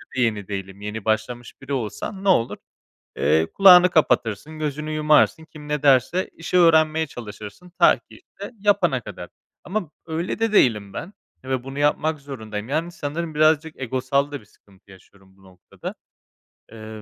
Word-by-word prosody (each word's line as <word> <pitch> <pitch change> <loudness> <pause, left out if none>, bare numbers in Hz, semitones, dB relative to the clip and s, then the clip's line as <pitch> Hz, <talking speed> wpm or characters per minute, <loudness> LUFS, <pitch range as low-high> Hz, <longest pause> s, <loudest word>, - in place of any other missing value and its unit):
yeni 110 -6 0
değilim. 95 0 -6
Yeni 105 +1 -6
başlamış 115 +4 -3
biri 135 +1 -5
olsan 135 - -4
ne 195 - +1
olur, 115 -10 +2 0.6
eee, 80 +1 +2
kulağını 180 -2 +8
kapatırsın, 150 - 0
gözünü 150 0 -3
yumarsın, 155 +1 +3
kim 150 -2 -13
ne 150 -1 -2
derse 140 +6 +3
işi 175 +2 -1
öğrenmeye 160 -2 +4
çalışırsın 110 - -10
ta - - +5
ki, - - -33
işte, 200 - -12
yapana 195 -10 +2
kadar. 90 -5 -9 0.4
Ama 185 -4 -3 0.2
öyle 165 +5 -3
de 225 -1 0
değilim 105 - +3
ben 190 - -7 0.3
ve 130 -1 -3
bunu 135 +1 -7
yapmak 150 +1 +1
zorundayım. 110 -5 -7
Yani, 165 +4 -2
sanırım 160 0 -5
birazcık 155 +1 +2
egosal 130 +3 -1
da 145 - -5
bir - - -20
sıkıntı 100 -1 -25
yaşıyorum 95 0 -20
bu 95 - -24
noktada. 90 -1 -10 0.8
Eee, 110 -1 -10
140 Hz, 155 wpm, -22 LUFS, 110-160 Hz, 0.8 s, kulağını